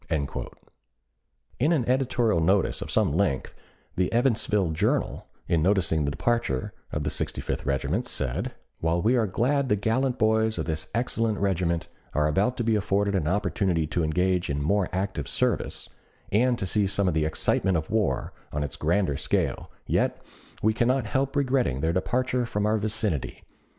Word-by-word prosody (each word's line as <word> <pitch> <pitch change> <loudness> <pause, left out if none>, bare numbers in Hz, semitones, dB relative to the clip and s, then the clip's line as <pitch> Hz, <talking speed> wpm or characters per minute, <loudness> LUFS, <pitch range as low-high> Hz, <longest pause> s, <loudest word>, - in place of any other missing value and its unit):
In 65 - -5
an 145 -8 +2
editorial 125 -6 +2
notice 95 +4 +2
of - - -5
some 105 -9 +2
length 85 -6 0 0.4
the 90 0 0
"Evansville 110 -7 +2
Journal," 80 - 0 0.2
in 85 -2 +2
noticing 85 -4 +2
the - - +1
departure 70 - -1 0.2
of 75 - -2
the - - -1
Sixty - - -3
fifth - - -3
Regiment, 65 -1 0
said: - - -2 0.2
While 85 +1 0
we 120 +4 +4
are 115 -3 +2
glad 130 +7 +1
the 105 - +4
gallant 125 +5 0
boys 110 -1 +2
of 80 - -2
this 80 -1 -3
excellent 115 -2 0
regiment 90 -4 0 0.3
are 75 0 +3
about 100 +11 +1
to 120 - 0
be 115 -1 +2
afforded 100 0 +1
an 90 -6 0
opportunity 90 -3 +1
to 85 +2 -1
engage 90 +3 +1
in 70 0 -1
more 100 +4 +1
active 95 -6 -2
service, - - -1 0.4
and 120 +4 +3
to 95 - -2
see 100 +1 +1
some 100 0 +1
of 90 - +2
the 80 -1 +1
excitement 90 +3 +1
of 80 - -4
war 110 -4 0 0.2
on 75 0 -2
its 70 0 -5
grander 85 0 +1
scale, - - -1 0.2
yet - - +1 0.4
we 110 +1 +4
cannot 125 +3 +1
help 135 0 -1
regretting 130 - +1
their 80 +2 +1
departure 125 +6 0
from 105 -2 -1
our 110 +1 +2
vicinity. 105 - -2
100 Hz, 170 wpm, -26 LUFS, 80-115 Hz, 0.4 s, we